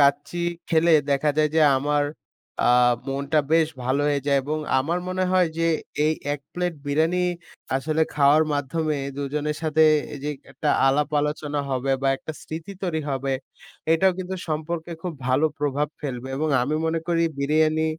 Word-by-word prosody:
কাচ্চি 145 +4 +2 0.3
খেলে 165 0 +4 0.2
দেখা 140 +2 +2
যায় 155 0 +3
যে, 160 - +4 0.2
আমার 145 +1 +1 0.6
আ - - +5 0.4
মনটা 140 +3 0
বেশ 160 -1 +4 0.2
ভালো 130 +3 +1
হয়ে 145 -1 +1
যায়, 140 -1 +3
এবং 150 +3 -2 0.2
আমার 160 +7 0
মনে 185 0 0
হয় 185 -2 +4
যে, 165 - +1 0.4
এই 155 - +3 0.2
১ 145 - -8
প্লেট 180 -1 -2
বিরিয়ানি 160 +5 +1 0.6
আসলে 155 +4 0
খাওয়ার 145 +1 +5
মাধ্যমে 150 +2 -1 0.2
দুজনের 150 +2 -2
সাথে 160 0 +3 0.3
এইযে 145 +1 -4 0.2
একটা 150 - -2 0.2
আলাপ-আলোচনা 150 +1 0
হবে, 130 +1 -1
বা 135 - +3
একটা 155 - -7
স্মৃতি 160 +5 -7
তৈরি 170 -4 -1
হবে 135 0 -1 0.6
এইটাও 185 +3 +4
কিন্তু 185 0 -4
সম্পর্কে 160 +2 -3
খুব 180 - -3 0.2
ভালো 130 +4 +3
প্রভাব 145 0 0
ফেলবে। 130 -3 -5
এবং 155 +3 0
আমি 145 +5 -1
মনে 165 0 0
করি 170 -1 +2 0.2
বিরিয়ানি 155 +2 +2
150 Hz, 155 wpm, -24 LUFS, 140-160 Hz, 0.6 s, আ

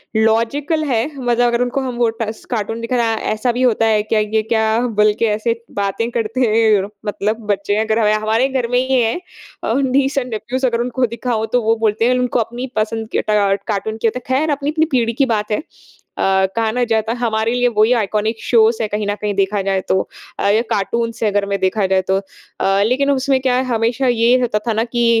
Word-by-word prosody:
Logical 230 +9 +1
हैं, 235 -4 +1
मतलब 245 -2 +1
अगर 235 0 +1
उनको 250 +3 -1
हम 255 -2 -4
वो 235 -1 +2
टस 220 0 -4
कार्टून 225 0 -2
दिखाना, 230 -1 0 0.2
ऐसा 220 +3 0
भी 245 +2 -3
होता 230 -3 +3
है 215 -1 +3
क्या? 215 +1 0
ये 215 +1 0
क्या? 220 0 +1
बोल 210 -1 +3
के - - +3
ऐसे 230 +1 -2
बातें 200 +3 -1
करते 230 +2 -2
हैं। 220 -3 +3 0.2
मतलब 215 +2 -2
बच्चे 200 0 -1
अगर 220 0 0
ह - - +4
या 215 - +3
हमारे 220 +4 +1
घर 260 -3 -1
में 245 - +3
ही 260 0 +2
है। 225 0 +1 0.5
अ, - - 0
नीस 270 +1 +1
एंड 255 -2 -1
नेफ्यूज़ 255 +4 -2
अगर 235 -1 0
उनको 250 +1 0
दिखाओ 235 -1 -2
तो 245 - +3
वो 225 +1 +3
बोलते 215 +2 +1
हैं 250 - +2
उनको 250 -1 0
अपनी 240 +3 -3
पसंद 220 +1 -1
के - - +2
ट 200 -2 +2
कार्टून 220 +1 -2
की 225 - +1
होता 240 +3 -2
है। 260 - -1
खैर 310 +1 0
अपनी 285 0 -1
अपनी 315 +1 +2
पीढ़ी 235 -3 +1
की 275 +4 +2
बात 215 -3 -1
है। 210 - -1 0.6
अ, 190 0 +3
कहा 225 -1 +1
ना 245 +2 0
जाता 225 -1 0
हमारे 225 -1 0
लिए 245 0 +2
वही 215 +3 +4
आइकॉनिक 215 0 -1
शोज़ 225 -1 +3
है 220 - 0
कहीं 210 0 -3
न 205 - 0
कहीं 210 -1 -1
देखा 195 +1 +1
जाए 195 0 0
तो। 190 - +3 0.4
अ, - - +1
या 215 +3 +3
कार्टून्स 230 +3 -1
है 215 - +3
अगर 200 0 +1
में 200 0 -2
देखा 190 +2 +1
जाए 190 0 +2
तो। 190 - +3 0.4
अ, 195 +1 +2
लेकिन 275 +4 +1
उसमें 270 0 +1
क्या 255 -1 +1
है 255 - +1
हमेशा 235 +2 0
ये 240 +1 +3
होता 230 -4 0
था 230 - +2
ना 220 - +1
कि 240 0 -1
225 Hz, 230 wpm, -18 LUFS, 215-245 Hz, 0.6 s, ह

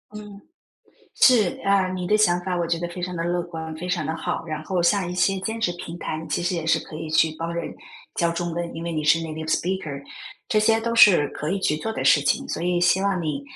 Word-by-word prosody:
嗯， 205 -1 -10 0.7
是， 225 -8 +4
啊， 195 -1 +3
你 180 -1 -4
的 210 - +3
想 175 -4 +4
法 185 0 -2
我 170 - 0
觉 170 0 0
得 175 - -3
非 175 +1 -8
常 180 0 -4
的 165 - -2
乐 175 0 0
观， 160 -2 -7
非 175 +3 -6
常 180 -4 -1
的 160 - -2
好。 165 - -3
然 155 -1 -4
后 180 +1 -1
像 180 0 +2
一 - - -4
些 195 +2 +2
兼 220 +4 -3
职 175 -6 0
平 170 +1 -7
台， 155 - -4
你 160 - -8
其 - - -1
实 180 +2 0
也 165 -2 -3
是 165 - +3
可 - - -12
以 160 0 -6
去 160 0 +2
帮 165 +1 -3
人 170 - -4 0.4
教 170 -1 +2
中 170 0 -3
文， 170 0 -4
因 165 - -6
为 170 - -3
你 155 -1 -2
是 150 +2 +4
native 160 -1 -6
speaker， 160 -5 -2 0.4
这 215 - +2
些 225 +1 +3
都 230 +1 -2
是 190 -10 +6
可 150 - -5
以 195 - 0
去 155 -5 0
做 220 - -3
的 - - -4
事 145 - +6
情。 145 - 0
所 - - -4
以 175 0 +1
希 175 +2 +3
望 195 -3 0
你， 150 -3 -3
175 Hz, 330 characters per minute, -23 LUFS, 160-190 Hz, 0.7 s, 是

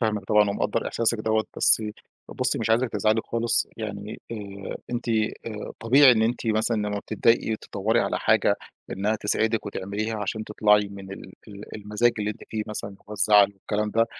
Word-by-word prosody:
فاهمِك 105 -4 -1
طبعًا 105 0 +3
ومقدّر 105 +3 -1
إحساسِك 115 -1 +1
دوَّة، 110 0 +1
بس - - +5 0.5
بُصّي، 125 -1 +1
مش 115 0 -1
عايزِك 120 +3 +3
تزعلي 110 +1 +1
خالص 115 0 +1
يعني، 105 -1 -6
آآ، 100 -3 -7
أنتِ، 120 0 -4 0.4
آآ، 105 -2 -6
طبيعي 130 +3 +7
إن 110 - +2
أنتِ 115 +1 -1
مثلًا 110 +1 +1
لمّا 105 -1 -2
بتضايقي 110 +1 +1
تدوّري 110 +4 -1
على - - -1
حاجة - - +3 0.4
إنها 105 +3 0
تسعدِك 110 +2 0
وتعمليها 100 +3 -3
عشان 110 +2 -3
تطلعي 105 -1 +3
من 95 -1 -9
ال 95 - -10 0.2
ال 100 +1 -10
المزاج 105 +3 +1
اللي 105 0 -1
أنتِ 105 - -9
فيه 110 -1 -3
مثلًا، 105 -2 -5
اللي 100 - -16
هو - - -5
الزعل 100 0 +5
والكلام 105 +2 -2
ده، 115 +1 +2
105 Hz, 180 wpm, -25 LUFS, 105-115 Hz, 0.5 s, طبيعي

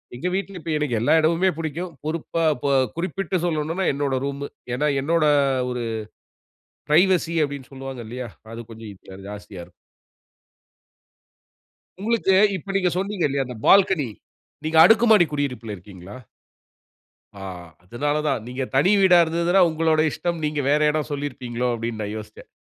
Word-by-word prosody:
எங்க 130 +9 -3
வீட்ல 195 0 -3
இப்ப 160 -1 -5
எனக்கு 140 -6 -1
எல்லா 120 - +3
இடமுமே 170 +4 +2
பிடிக்கும். 165 +3 -4
பொறுப்பா 165 +1 -2
இப்ப 125 - -4 0.3
குறிப்பிட்டு 185 +1 -2
சொல்னும்னா 165 +3 -1
என்னோட 140 -1 -1
ரூம்மு. 140 0 -4 0.3
ஏன்னா, 150 +4 +1
என்னோட 165 +2 +1 0.5
ஒரு 125 -1 -3 1.1
பிரைவசி 170 +1 +3
அப்டினு 140 -2 -7
சொல்லுவாங்க 135 -1 -7
இல்லையா, 125 +1 -6 0.3
அது 115 - -7
கொஞ்சம் 110 -1 -9
இப்ப 95 0 -14
ஜாஸ்தியா 105 -1 -9
இருக்கும். 90 - -20 2.3
உங்களுக்கு, 215 -2 +1 0.2
இப்ப 195 +3 -9
நீங்க 185 -2 +2
சொன்னீங்க 195 -1 -2
இல்லையா, 140 -1 -1
அந்த 125 -2 -8
பால்கனி, 190 -8 +5 0.6
நீங்க 160 +1 -1
அடுக்குமாடி 220 -4 +6
குடியிருப்புல 125 -7 -3
இருக்கிங்களா? 95 +1 -12 1.2
ஆ, - - -8 0.4
அதுனால 135 +10 -2
தான். 135 -6 -1
நீங்க 125 +2 -4
தனி 180 +9 +4
வீடா 185 -2 +6
இருந்துதுனா, 170 +3 +1
உங்களோட 160 0 +1
இஷ்டம். 170 -2 -3
நீங்க 150 -1 -2
வேற 150 - +3
இடம் 150 -1 -2
சொல்லியிருப்பீங்களோ 125 -4 -3
அப்டினு 115 -1 -4
நான் 105 +1 -4
யோசிச்சேன். 105 0 -10
150 Hz, 140 wpm, -23 LUFS, 125-175 Hz, 2.3 s, அடுக்குமாடி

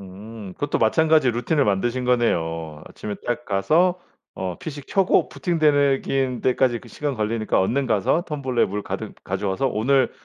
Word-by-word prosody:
음 100 +1 -10
그것도 145 - -2
마찬가지로 155 +2 +3
루틴을 140 +4 +1
만드신 120 +5 0
거네요. 80 -10 0
아침에 105 -1 -6
딱 120 0 -2
가서 165 - +2 0.3
어 95 -2 -4
PC 145 -3 -7
켜고 195 -1 +2
부팅되는 145 -5 +2
긴 130 -2 -1
때까지 125 -2 +2
그 - - -15
시간 145 -2 -3
걸리니까 110 -2 0
얼른 130 +8 0
가서 110 - +1
텀블러 130 -7 -1
물 105 +1 -4
가득 - - -5
가져와서 95 +6 -1
'오늘 130 +5 +2
120 Hz, 350 characters per minute, -23 LUFS, 105-140 Hz, 0.3 s, 마찬가지로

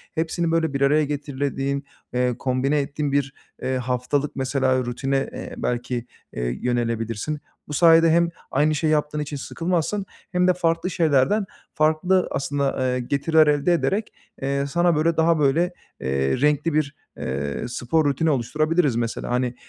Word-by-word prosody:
hepsini, 165 +1 -1
böyle, 165 -3 +1
bir 140 - -2
araya 150 +2 +4
getirdiğin 140 -1 -2 0.3
eee, 125 -1 +1
kombine 135 +3 +1
ettiğin 145 +1 -2
bir, 135 -1 0 0.3
eee, 130 0 -1
haftalık, 125 +3 -1
mesela, 130 -1 +1
rutine, 135 +3 -1
eee, - - -7
belki, 120 0 -2 0.3
eee, - - -2
yönelebilirsin. 115 +3 -1 0.3
Bu 150 - -6
sayede 165 +1 +6
hem 170 +1 +3 0.2
aynı 150 +3 +2
şeyi 155 +1 +1
yaptığın 150 0 0
için 150 -1 -4
sıkılmazsın 175 +6 -2 0.3
hem 180 0 +2
de 185 - +5
farklı 165 0 0
şeylerden 165 +4 +2 0.3
farklı 160 +4 +2
aslında, 140 0 -1
eee, 125 -1 0
getiriler 150 +5 +3
elde 150 +4 +3
ederek, 200 +5 0 0.3
eee, 140 +1 0
sana 175 +3 +2
böyle, 160 +2 +1
daha 165 0 +3
böyle, 160 +6 +2 0.3
eee, 70 - 0
renkli 150 +2 +2
bir, 150 -1 0 0.2
eee, 70 +2 -3
spor 125 +6 0
rutini 145 +3 +1
oluşturabiliriz, 150 +2 +1
mesela. 115 -1 -2
Hani, 125 0 0
145 Hz, 150 wpm, -23 LUFS, 130-160 Hz, 0.3 s, sayede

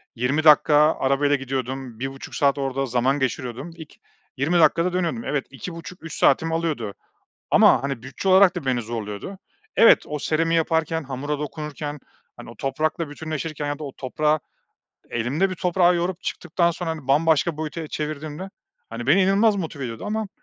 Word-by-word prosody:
20 130 +6 0
dakika 150 -1 +6 0.2
arabayla 140 +2 +2
gidiyordum, 130 -2 -4
1.30 135 +1 -6
saat 140 -1 +2
orada 135 0 -1
zaman 125 +3 +1
geçiriyordum, 130 +3 -3
ik 160 -3 -13 0.4
20 165 +6 +2
dakikada 170 +2 +3
dönüyordum. 185 +6 -1
Evet, 145 -2 -1
2.30 165 +5 -9
3 165 - -7
saatimi 160 +4 +3
alıyordu 155 -11 -2 0.6
ama, - - +6
hani, 135 -4 -3
bütçe 130 +8 -3
olarak 190 0 +6
da 170 -6 -5
beni 125 -2 +1
zorluyordu. 110 - -6 0.4
Evet, 230 - +7
o 150 0 -4
seramiği 165 +3 +1
yaparken 160 0 0
hamura 140 +2 -4
dokunurken, 150 0 -5 0.4
hani, - - -10
o 115 - -11
toprakla 155 - -2
bütünleşirken 155 0 -4
ya 145 0 -3
da - - -6
o 140 - -6
toprağı 150 +4 0 0.7
elimle, 135 +12 0
bir 185 - -4
toprağı 180 0 +3
yoğurup 175 +1 -2
çıktıktan 170 0 0
sonra, 170 0 -5
hani, 155 -5 -8
bambaşka 155 +2 +2
boyuta 155 0 -5
çevirdiğimde, 155 +4 -5 0.4
hani, 115 +2 -6
beni 170 +8 +5
inanılmaz 205 +3 +3
motive 160 -7 -4
ediyordu 115 -3 -6
ama 215 0 -2
150 Hz, 160 wpm, -23 LUFS, 135-165 Hz, 0.7 s, Evet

